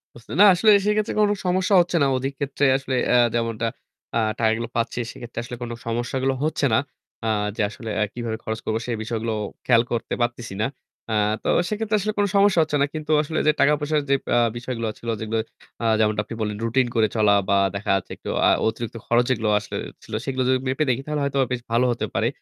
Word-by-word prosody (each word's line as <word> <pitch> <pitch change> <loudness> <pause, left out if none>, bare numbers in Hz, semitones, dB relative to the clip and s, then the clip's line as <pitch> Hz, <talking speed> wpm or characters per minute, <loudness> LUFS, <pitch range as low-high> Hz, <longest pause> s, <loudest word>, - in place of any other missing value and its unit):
বুঝতে 120 - -11
না - - +10
আসলে 215 +5 +4
সেক্ষেত্রে 210 +1 +1
কোন 205 - +4 0.2
সমস্যা 185 +2 +2
হচ্ছে 175 0 -2
না। - - +4
অধিক 135 +2 -3
ক্ষেত্রে 140 0 0
আসলে 135 -1 -3 0.2
আ - - +7 0.2
যেমনটা 115 -1 -1 0.5
আ - - +3 0.2
টাকাগুলো 115 +1 +1
পাচ্ছি 115 +1 -1
সেক্ষেত্রে 120 -1 -8
আসলে 120 +1 -7
কোন 120 - -5
সমস্যাগুলো 120 +3 -1
হচ্ছে 155 -2 0
না। - - +5 0.5
আ - - 0 0.3
যে - - 0
আসলে 110 +1 -8
আ - - +4
কিভাবে 115 -2 -4
খরচ 110 0 -3
করবো 110 +1 0
সে 125 - -3
বিষয়গুলো 115 0 -3 0.3
খেয়াল 120 -2 +5
করতে 115 - -2
পারতেছি 120 -3 -2
না। - - +2 0.4
আ - - 0 0.3
তো - - -4 0.2
সেক্ষেত্রে 215 0 -1
আসলে 215 +2 -2
কোন 205 - +4
সমস্যা 200 -3 +5
হচ্ছে 150 -1 -1
না। - - +5
কিন্তু 155 0 -4
আসলে 155 +1 -2
যে - - +7
টাকা-পয়সার 150 +1 +2
যে 140 - +5
পা 120 - +2 0.2
বিষয়গুলো 120 -2 -4
ছিল 115 - -6
যেগুলো 110 +1 -2 0.5
আ - - 0
যেমনটা 105 -1 +2
আপনি 115 - -7
বললেন 105 -1 -2
রুটিন 125 +2 +2
করে 110 -1 +4
চলা 105 -2 +4 0.2
বা 100 - +4 0.2
দেখা 100 0 -1
যাচ্ছে 95 - -4
একটু - - -8 0.2
আ - - +6 0.2
অতিরিক্ত 115 +1 -3
খরচ 120 +1 +4
যেগুলো 110 -4 +1
আসলে - - -6 0.3
ছিল - - -12
সেগুলো 130 -1 -1
যদি 130 - +4
মেপে 135 +4 +1
দেখি 125 +2 +1
তাহলে 150 -1 -2
হয়তোবা 135 -1 +1
বেশ 125 -1 -1
ভালো 120 +2 +3
হতে 120 - -2
পারে। 115 - +1
120 Hz, 210 wpm, -23 LUFS, 115-145 Hz, 0.5 s, না